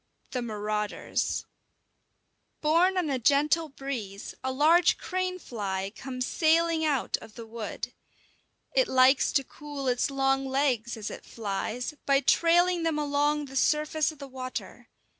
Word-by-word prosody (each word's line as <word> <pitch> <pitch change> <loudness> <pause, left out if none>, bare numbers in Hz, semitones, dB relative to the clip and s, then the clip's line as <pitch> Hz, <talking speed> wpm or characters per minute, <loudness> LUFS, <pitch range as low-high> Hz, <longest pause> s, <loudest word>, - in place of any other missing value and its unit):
IV: - - -43
THE 250 - -2
MARAUDERS 210 -2 -2 1.1
Borne 340 +5 +3
on 335 -5 0
a 260 - 0
gentle 300 +5 +3
breeze, 245 -8 -6
a 260 - -1
large 320 +6 +4
crane 370 0 -2
fly 195 - -4
comes 255 0 -4
sailing 330 +1 +2
out 290 -5 +1
of 215 - -14
the 230 - -8
wood. 225 -1 -6 0.8
It - - +3
likes 260 -2 +4
to 275 - +3
cool 290 0 -7
its 250 +1 +1
long 270 0 +1
legs, 255 -4 0
as 215 -1 -5
it - - -8
flies, 225 +5 -4
by 275 -1 +5
trailing 345 +4 +3
them 325 -2 0
along 295 0 +1
the 270 -1 -11
surface 305 +2 +2
of 310 - -14
the 280 0 -8
water. 255 -1 -7
275 Hz, 145 wpm, -28 LUFS, 245-315 Hz, 1.1 s, by